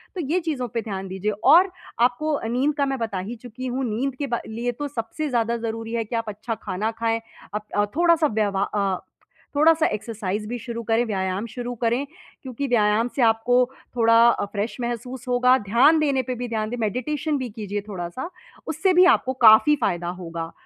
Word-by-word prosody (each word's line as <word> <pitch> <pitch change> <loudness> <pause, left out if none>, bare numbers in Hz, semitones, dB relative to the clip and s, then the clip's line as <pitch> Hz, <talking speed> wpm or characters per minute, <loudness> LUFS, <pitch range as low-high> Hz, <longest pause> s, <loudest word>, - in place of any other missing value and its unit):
तो 360 - -2
ये 365 - +3
चीज़ों 300 -7 -3
पे 230 - 0
ध्यान 195 -3 -5
दीजिए 190 +3 -2 0.2
और 365 +2 +5 0.3
आपको 280 +5 +1
नींद 265 +5 +1
का 280 - +2
मैं 270 -2 -2
बता 220 -5 -2
ही - - -5
चुकी 250 +1 -7
हूँ। 255 +1 -2
नींद 255 +5 -2
के 280 +2 -3
ब 235 -2 -2
लिए 235 +2 -2
तो 290 +5 -5
सबसे 280 +4 -4
ज़्यादा 235 -2 0
ज़रूरी 225 0 -5
है 230 -1 -1
कि 225 - -5
आप 230 -1 -2
अच्छा 215 +3 -4
खाना 210 +1 -3
खाएँ, 225 0 -1 0.3
आप 205 -1 -2
थोड़ा-सा 335 -2 +4
व्यव 210 -5 0
अ, 200 -2 -1 0.6
थोड़ा-सा 320 +2 +5
एक्सरसाइज़ 210 -1 -4
भी 245 +2 -3
शुरू 235 0 -5
करें, 225 +2 +2
व्यायाम 190 -1 -2
शुरू 245 +1 -4
करें, 240 +4 0 0.4
क्योंकि 265 +2 -4
व्यायाम 225 -1 +2
से 270 - 0
आपको 225 +2 +1 0.4
थोड़ा 230 +1 +6 0.2
फ्रेश 210 +2 -3
महसूस 240 +1 -5
होगा। 250 +1 +4
ध्यान 290 +8 +5
देने 280 -3 +2
पे 255 +1 -4
भी 245 +1 -4
ध्यान 215 -1 -2
दें, 245 - -4
मेडिटेशन 285 +7 -1
भी 255 -3 -4
कीजिए 205 -2 -4
थोड़ा-सा 190 - -5 0.4
उससे 340 +5 +1
भी 360 +1 +7
आपको 260 - -3
काफ़ी 220 +8 +7
फ़ायदा 175 -7 -1
होगा। 165 0 -5
235 Hz, 190 wpm, -23 LUFS, 215-260 Hz, 0.6 s, भी